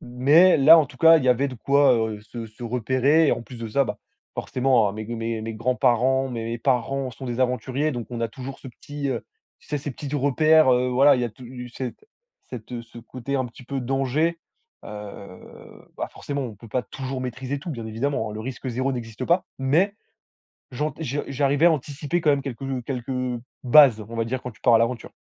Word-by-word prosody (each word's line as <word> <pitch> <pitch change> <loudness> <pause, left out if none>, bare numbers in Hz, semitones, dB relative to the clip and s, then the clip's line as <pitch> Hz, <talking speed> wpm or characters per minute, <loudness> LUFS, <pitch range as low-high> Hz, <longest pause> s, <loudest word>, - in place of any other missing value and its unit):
Mais 145 +10 +5
là 155 +4 +8
en 155 - +3
tout 135 - -15
cas, 165 +4 +7
il 135 - -3
y - - +2
avait 130 +3 +3
de 130 - -7
quoi, 140 +2 +4
heu, 110 -2 -1
se 115 +1 -8
se 110 +3 -14
repérer. 130 +6 +2
Et - - +4
en - - -3
plus 120 0 -11
de 115 - -5
ça, 140 +5 +2
bah, - - -5 0.4
forcément, 125 -4 +2
hein, - - -4
mes 110 +1 -6
mes 115 -1 -3
mes 115 +1 -5
grands 120 +4 -1
parents, 130 +4 +2
mes 115 -3 -4
mes 115 0 -4
parents 130 +1 0
sont 130 - -9
des 120 -1 -4
aventuriers. 130 +4 0
Donc 120 -3 -5
on 120 -1 -5
a 115 - 0
toujours 130 +4 -8
ce - - -12
petit, 145 +3 -6
heu, - - -3 0.4
tu - - -23
sais, 150 - -1
ces 145 +1 -5
petits 140 +2 -7
repères. 145 +1 +4
Heu, 125 +1 +2
voilà, 135 +3 +5
il 125 - -1
y - - +1
a - - -1
tu 125 +2 -10
cet 125 +1 -5 0.6
cette 120 0 -7
ce 115 0 -13
côté 130 +3 -5
un 130 - 0
petit 120 +2 -14
peu 135 +1 -4
danger. 135 +6 0 0.4
Heu, - - -9 1.1
bah, - - -3
forcément, 140 -1 -4
on 120 -4 -6
peut 115 +3 -14
pas 125 +3 -1
toujours 130 +1 -6
maîtriser 130 +2 -4
tout. 150 - -9
Bien 115 -5 -5
évidemment, 115 0 -2
le 105 - -6
risque 130 +3 -6
0 130 +3 -1
n'existe 120 0 -5
pas. 175 +4 +2
Mais 165 +10 +2 0.8
j'ant 150 +5 -2
je 145 -2 -2
j'arrivais 140 +3 +2
à 175 - +7
anticiper 145 +3 -2
quand 155 - +3
même 140 -1 +1
quelques, 135 -1 -6
heu 135 -2 -3
quelques, 125 -1 -5
heu, 125 -2 -2 0.2
bases, 130 -3 +7
on 115 - -7
va 115 - 0
dire, 130 +2 -3
quand 125 - -5
tu 110 - -20
pars 120 - +4
à - - +7
l'aventure. 115 +1 -1
130 Hz, 230 wpm, -24 LUFS, 120-140 Hz, 1.1 s, là